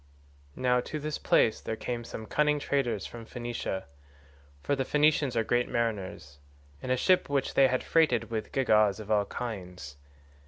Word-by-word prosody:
"Now 125 -1 +2
to 155 - -4
this 150 +1 -4
place 110 - +3
there 110 - -3
came 120 +1 -4
some 110 -1 -7
cunning 150 +5 +2
traders 135 -8 -1
from 120 -1 -8
Phoenicia 120 -5 -4 0.8
(for 140 - +1
the 135 - -1
Phoenicians 145 -2 +2
are 115 - +3
great 120 +2 0
mariners) 95 -10 -3 0.4
in 130 - -6
a 130 - +2
ship 185 +6 +3
which 140 -2 0
they 135 - +6
had 130 0 -1
freighted 140 -8 +2
with 110 -1 -3
gewgaws 110 -6 +3
of 110 0 -7
all 105 -1 +3
kinds. 90 -12 -7
120 Hz, 165 wpm, -29 LUFS, 110-135 Hz, 0.8 s, they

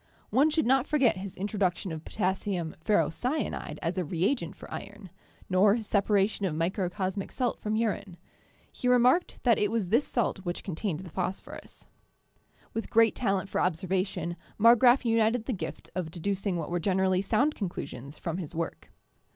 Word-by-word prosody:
One 285 +4 +4
should 315 0 +1
not 265 +2 +3
forget 270 -9 +3
his 190 0 -7
introduction 190 -2 -1
of 160 -1 -6
potassium 190 -4 -2
ferrocyanide 190 - 0
as 175 +3 -1
a - - 0
reagent 170 - -1
for - - -11
iron, 200 -2 -8 0.4
nor 195 +3 +4
his 230 -2 -4
separation 200 -1 +2
of 155 - -3
microcosmic 185 +3 -2
salt 250 -2 -1
from 215 0 -2
urine; 210 -5 -1 0.5
he 250 - -4
remarked 250 +7 +4
that 235 -3 +4
it 210 - +2
was 220 -5 -1
this 235 +8 +3
salt 235 -5 0
which 175 -2 -4
contained 180 -2 -3
the 180 -3 -10
phosphorus. 185 0 -5 0.9
With 225 - -3
great 225 -1 +5
talent 195 -5 0
for - - -1
observation 180 0 -1 0.2
Marggraf 240 +3 +6
united 225 0 +2
the 255 - -1
gift 195 - -6
of 175 -3 -3
deducing 190 +2 -2
what 165 0 -4
were 175 - 0
generally 185 +1 +2
sound 250 +9 +2
conclusions 145 - -6
from 170 0 -4
his 170 -2 -7
work. 165 0 -4
195 Hz, 160 wpm, -29 LUFS, 175-225 Hz, 0.9 s, Marggraf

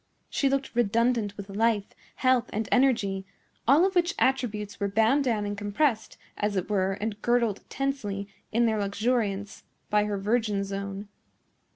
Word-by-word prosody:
She 275 - +2
looked 275 0 -1
redundant 230 -2 +1
with 200 -1 -7
life, 210 0 +1 0.3
health, 255 -2 +2
and 215 0 -2
energy; 220 -7 +2 0.4
all 290 +8 +6
of 380 - 0
which 350 -1 +2
attributes 215 -6 0
were 200 - 0
bound 225 +8 +3
down 225 -5 0
and 205 0 -3
compressed, 220 +4 0 0.2
as 210 0 -1
it 190 +2 -2
were 195 -1 +1
and 210 +1 -4
girdled 235 -4 +1
tensely, 210 -8 -2 0.2
in 235 +2 +3
their 220 -2 +1
luxuriance, 205 -1 -1 0.3
by 210 0 +3
her 205 -1 -2
virgin 210 0 0
zone. 200 +1 -5
215 Hz, 155 wpm, -27 LUFS, 200-245 Hz, 0.4 s, all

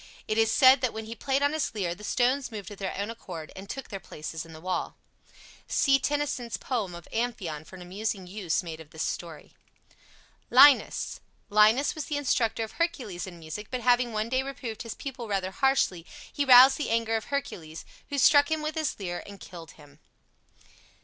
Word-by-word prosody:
It 215 - 0
is 225 0 +3
said 260 +2 +6
that 255 -3 0
when 220 0 -6
he 225 - -6
played 270 +4 -1
on 285 +1 +2
his 310 -6 -2
lyre 180 -5 -1
the 210 - -13
stones 255 +5 +1
moved 205 -3 -7
of 205 - -10
their 195 -2 -4
own 200 +3 -2
accord 180 -8 -8
and 195 +1 -10
took 270 0 -6
their 195 - -5
places 160 -1 -7
in - - -13
the 160 - -10
wall. 185 +2 -3 0.7
See 275 -1 +3
Tennyson's 285 -5 -2
poem 215 -9 -3
of 170 - -11
"Amphion" 195 -10 -3
for 190 - -12
an 180 - -10
amusing 195 +1 -4
use 185 -2 -2
made 165 -2 -7
of 160 -2 -12
this 160 0 -4
story. 165 -3 -6 1.0
LINUS 285 -2 +5 0.3
Linus 215 +7 +5
was 310 -3 -5
the 295 - -2
instructor 235 -5 0
of 220 - -6
Hercules 250 - -3
in 175 -2 -10
music, 165 +6 -7
but 255 -1 -3
having 245 -1 +3
one 215 0 -1
day 260 +1 +1
reproved 265 -5 -6
his 230 -2 -6
pupil 255 -4 -7
rather 190 -2 -1
harshly, 190 -9 +1 0.3
he 285 - 0
roused 260 +1 +8
the 295 - -2
anger 225 0 +1
of 220 - -2
Hercules, 165 - -5 0.2
who 285 - -3
struck 285 +2 +6
him 315 -1 -1
with 305 +1 -2
his 310 -7 -2
lyre 175 -3 -4
and 200 -1 -11
killed 165 -4 -11
him. 145 -1 -18
220 Hz, 200 wpm, -27 LUFS, 185-265 Hz, 1.0 s, roused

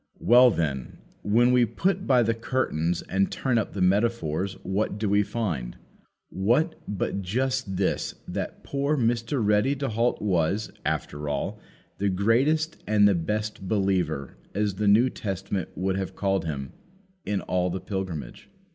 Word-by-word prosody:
Well, 125 +1 +6
then, 75 - -2 0.2
when 120 +4 +3
we 125 -1 +5
put 185 - 0
by 125 -3 +5
the 115 +1 +1
curtains 90 -8 -1
and 95 +1 0
turn 125 -4 +1
up 110 - -3
the 95 - 0
metaphors, 95 -3 +1
what 100 +2 -1
do 105 0 -1
we 100 +1 +4
find? 100 - -3 0.5
What, 120 - +2
but 100 0 -2
just 125 +1 -1
this, 95 - -1
that - - -5
poor 140 +2 0
Mr. 115 0 0
Ready 105 +7 +3
to 135 -1 -2
halt 115 +2 +1
was, 95 +1 0
after 75 0 -2
all, 70 - -3 0.4
the 100 0 +1
greatest 130 - +1
and 105 -1 +5
the 100 - +4
best 105 +3 -2
believer, 90 - 0 0.2
as 105 0 +1
the 105 +2 -1
New 115 +6 +5
Testament 95 -1 -3
would 95 +1 -1
have 95 -1 -4
called 95 -3 0
him, 70 -4 -4 0.5
in 100 -2 -1
all 90 0 0
the 95 +2 -3
pilgrimage. 95 -6 -5
100 Hz, 155 wpm, -26 LUFS, 95-120 Hz, 0.5 s, Well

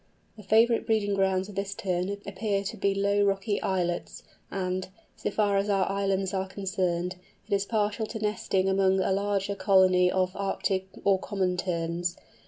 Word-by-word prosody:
The 215 - -11
favourite 225 +3 +3
breeding 215 -2 +1
grounds 190 -1 +1
of 205 - -10
this 195 0 -3
Tern 185 -1 -1 0.2
appear 200 0 -1
to 195 - -4
be 200 0 0
low 200 +1 +2
rocky 200 +1 0
islets 175 -2 -2 0.3
and—so 185 0 -4
far 205 -2 +1
as 200 +1 0
our 195 -2 +2
islands 195 -1 0
are 190 0 -1
concerned—it 185 0 -3
is 200 0 +1
partial 215 0 0
to 225 - -5
nesting 210 -3 0
among 190 0 +3
a 190 - +1
larger 200 0 0
colony 185 -2 +4
of 185 -1 +1
Arctic 195 -1 -1 0.2
or 195 -1 +3
Common 190 -2 -1
Terns. 175 -1 -2
195 Hz, 160 wpm, -28 LUFS, 185-200 Hz, 0.3 s, colony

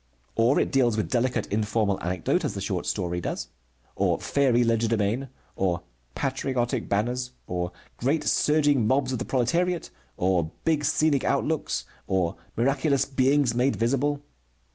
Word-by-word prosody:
Or 115 +5 +4
it - - 0
deals 120 -5 +3
with 110 - -2
delicate 125 -2 +1
informal 105 -1 0
anecdote 90 +1 0
as - - -2
the - - -3
short - - -2
story 90 0 -1
does, 65 -6 -4 0.5
or - - +1
fairy 130 -4 +2
legerdemain, 115 +2 +1 0.3
or 90 -2 0 0.3
patriotic 130 -3 -1
banners, 125 +5 -1
or 90 -1 -3 0.3
great 145 +5 +1
surging 145 -6 +3
mobs 130 +1 +2
of 125 - -2
the - - -3
proletariat, 170 +8 0 0.3
or 90 -3 +1 0.2
big 155 -2 +2
scenic 155 -3 +2
outlooks, - - 0 0.2
or 95 -2 0 0.2
miraculous 135 +2 +2
beings 135 -1 +2
made 125 +3 +2
visible. 140 +5 0
125 Hz, 140 wpm, -26 LUFS, 105-140 Hz, 0.5 s, Or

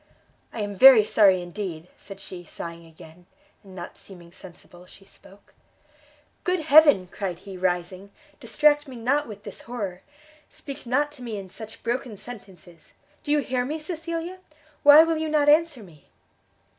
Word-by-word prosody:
"I 225 - -6
am 205 0 -4
very 240 +2 +8
sorry 195 -4 +3
indeed!" 175 -2 -7
said 195 -1 -12
she, 185 -2 -10
sighing 170 0 -9
again, 160 +2 -17 0.4
and 190 -2 -15
not 175 -1 -9
seeming 175 -3 -15
sensible 180 -1 -15
she 195 - -17
spoke. 195 0 -18 0.9
"Good 365 -1 0
Heaven!" 295 -10 +6
cried 190 -4 -4
he, 195 -1 -9
rising, 180 +1 -3 0.3
"distract 295 0 +2
me 260 - -10
not 265 +6 0
with 210 -2 -11
this - - -8
horror! 205 -7 -6 0.5
speak 275 -3 -10
not 290 +4 0
to 290 -3 -12
me 230 -4 -5
in 190 -2 -9
such 220 +1 -11
broken 235 -2 -3
sentences! 185 -8 -12 0.3
Do 290 - -5
you 295 0 +3
hear 255 -2 -2
me, 295 +5 -4
Cecilia? 335 +2 -6 0.4
why 290 +2 +9
will 325 -1 -1
you 315 0 -3
not 300 -1 +1
answer 305 -5 +3
me?" 160 -6 -19
215 Hz, 160 wpm, -24 LUFS, 185-290 Hz, 0.9 s, why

